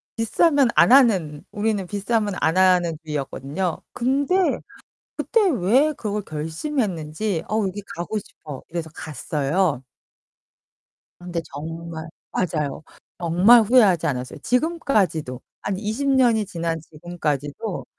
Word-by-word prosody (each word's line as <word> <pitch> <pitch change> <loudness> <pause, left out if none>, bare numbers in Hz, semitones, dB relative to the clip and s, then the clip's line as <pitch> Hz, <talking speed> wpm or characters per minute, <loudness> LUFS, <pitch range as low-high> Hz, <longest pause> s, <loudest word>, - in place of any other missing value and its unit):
비싸면 275 +4 +3
안 - - +6
하는 190 - +4
우리는 205 -2 -1
비싸면 205 +1 -1
안 160 +3 +2
하는 180 -3 +4
주의였거든요. 150 +4 -3
근데 275 +8 +1 0.8
그때 460 - +2
왜 260 - +3
그걸 210 -4 -3
결심했는지 165 - -3
'어 215 - 0
여기 200 +2 -5
가고 175 +6 -3
싶어.' 150 -7 -10
이래서 165 -1 -4
갔어요. 150 0 -1 1.4
근데 175 -1 -4
정말 165 +2 -6 0.3
맞아요. 155 -5 -2 0.4
정말 180 +8 +6
후회하지 210 -7 +4
않았어요. 125 0 -3
지금까지도 215 - 0 0.2
한 195 - -2
20 220 +7 -2
년이 240 -6 +3
지난 165 -2 -3
지금까지도 155 - -4
185 Hz, 260 characters per minute, -23 LUFS, 160-225 Hz, 1.4 s, 안